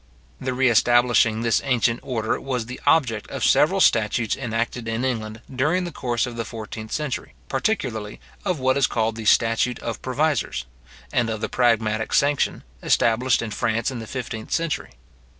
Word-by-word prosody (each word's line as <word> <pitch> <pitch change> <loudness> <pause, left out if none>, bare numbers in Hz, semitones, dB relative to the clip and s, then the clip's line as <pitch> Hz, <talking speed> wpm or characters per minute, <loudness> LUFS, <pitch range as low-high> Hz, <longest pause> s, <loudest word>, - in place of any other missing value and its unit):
The 130 -1 -3
re 130 +1 +3
establishing 120 -1 +4
this 115 -2 +2
ancient 120 -3 +1
order 115 -4 -2
was 125 -4 -2
the 125 +2 -8
object 115 -9 +2
of - - -2
several - - +4
statutes 115 -3 +3
enacted 115 -1 -3
in 115 +3 -1
England 110 -3 -3
during 155 +8 +1
the 175 - -4
course 120 -5 -1
of 120 -2 -7
the 115 - -1
fourteenth 110 -1 -8
century, 150 - -3
particularly 110 - -2 0.2
of 185 -5 0
what 130 +1 +2
is 140 - +3
called 110 -1 0
the 110 -1 -7
statute 115 +3 +3
of 115 - -5
provisors; 130 - -1 0.5
and 120 -2 +2
of 110 -1 -3
the - - -3
pragmatic 110 -3 +1
sanction, 145 0 +2 0.2
established 115 +1 +2
in 110 - -5
France 115 +4 0
in 125 - -5
the 110 - -7
fifteenth 115 -3 -6
century. 165 -2 -1
120 Hz, 170 wpm, -23 LUFS, 110-130 Hz, 0.5 s, establishing